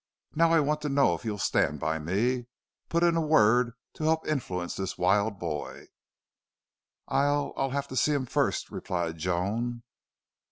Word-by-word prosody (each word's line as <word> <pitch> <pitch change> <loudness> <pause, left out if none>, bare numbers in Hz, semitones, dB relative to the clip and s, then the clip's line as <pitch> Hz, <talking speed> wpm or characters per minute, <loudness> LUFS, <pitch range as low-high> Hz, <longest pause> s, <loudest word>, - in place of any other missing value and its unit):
Now, 165 +1 +3
I 165 - +5
want 150 +1 0
to 150 - -2
know 140 0 +3
if - - -5
you'll 105 -2 -2
stand 75 -6 +1
by 80 +3 -1
me 115 +10 0 0.4
put 170 +1 +1
in 170 -1 +4
a 165 - +2
word 125 -6 +4 0.2
to - - -7
help 160 +1 +1
influence 90 - -2
this 95 -1 -4
wild 100 +3 +2
boy." 80 -4 -5 1.2
"I'll 145 +1 +1
I'll 135 - 0
have 140 +1 -2
to 130 - -6
see 150 +3 +2
him 140 -3 0
first," - - -1
replied 85 -2 -3
Joan. 105 +8 -2
120 Hz, 165 wpm, -28 LUFS, 90-145 Hz, 1.2 s, I